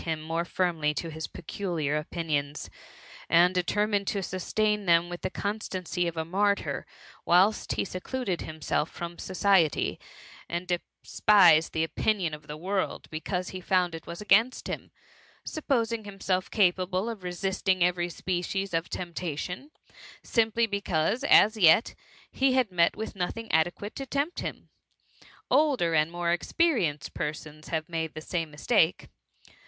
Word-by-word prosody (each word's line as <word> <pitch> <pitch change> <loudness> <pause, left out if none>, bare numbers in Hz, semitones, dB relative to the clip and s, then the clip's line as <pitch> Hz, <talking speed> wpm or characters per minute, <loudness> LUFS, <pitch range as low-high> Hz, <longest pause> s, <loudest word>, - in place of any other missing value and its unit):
21 160 -2 -1
him 155 - -10
more 165 +1 -1
firmly 165 -5 0
to 165 +1 -4
his 160 0 -5
peculiar 170 -5 -3
opinions, 150 -2 -3 0.6
and 175 +2 +5
de 180 - +2
termined 205 +3 +1
him 200 - -11
to 195 0 -1
sustain 210 +3 -1
them 170 0 +4
with 175 0 -6
the - - -2
constancy 185 -4 -3
of 170 -1 -4
a 160 - -1
martyr, 200 +4 0 0.4
whilst 190 +5 +3
he - - -1
secluded 190 0 -3
himself 155 0 -2
from 170 0 -7
society, 185 -5 +2 0.5
and 175 +1 -3 0.4
despised 180 -7 +5
the 160 - 0
opinion 180 0 0
of 150 - -9
the 150 - -6
world, 190 +4 -2
because 180 +4 -3
he 185 - -7
found 180 -1 +1
it 165 - -8
was 170 0 -7
against 220 +5 +3
him; - - -5 0.6
supposing 230 -7 -1
himself 195 -2 -2
capable 185 0 +1
of 225 -4 -5
resisting 185 +1 0
every 175 0 +1
species 185 +2 -3
of 165 +1 -1
temptation, 180 - -5 0.5
simply 230 0 +2
because, 200 - -1
as 220 -4 +6
yet, 185 +3 +5 0.4
he 265 -1 +2
had 255 -6 +2
met 170 -1 +3
with 220 0 -5
nothing 205 +5 -4
adequate 175 +6 0
to 275 - -5
tempt 285 +6 -1
him. - - -6 0.8
Older 270 - +3
and 155 +1 +2
more 175 0 -1
experienced 175 - 0
persons 155 0 -5
have 160 -1 -2
made 160 -2 -3
the 155 - -6
same 165 0 -3
mistake. 160 +3 +1
180 Hz, 150 wpm, -28 LUFS, 165-205 Hz, 0.8 s, as